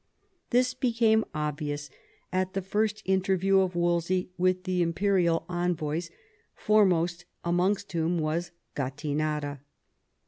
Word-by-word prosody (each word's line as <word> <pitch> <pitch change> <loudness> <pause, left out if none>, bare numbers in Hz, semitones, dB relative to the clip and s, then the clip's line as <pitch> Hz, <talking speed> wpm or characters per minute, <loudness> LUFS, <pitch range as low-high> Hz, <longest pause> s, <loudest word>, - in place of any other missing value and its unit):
This 250 +1 +3
became 230 -3 +2
obvious 145 -1 -3 0.4
at 185 0 0
the 195 - -1
first 210 +2 -1
interview 190 0 +2
of 185 -2 0
Wolsey 175 +1 0
with 185 0 +1
the 185 -1 0
imperial 175 -1 +2
envoys, 175 -2 -1 0.5
foremost 180 -5 +2 0.2
amongst 185 +4 +1
whom 170 +1 0
was 160 +2 -1 0.3
Gattinara. 145 +1 -2
180 Hz, 105 wpm, -28 LUFS, 160-195 Hz, 0.5 s, This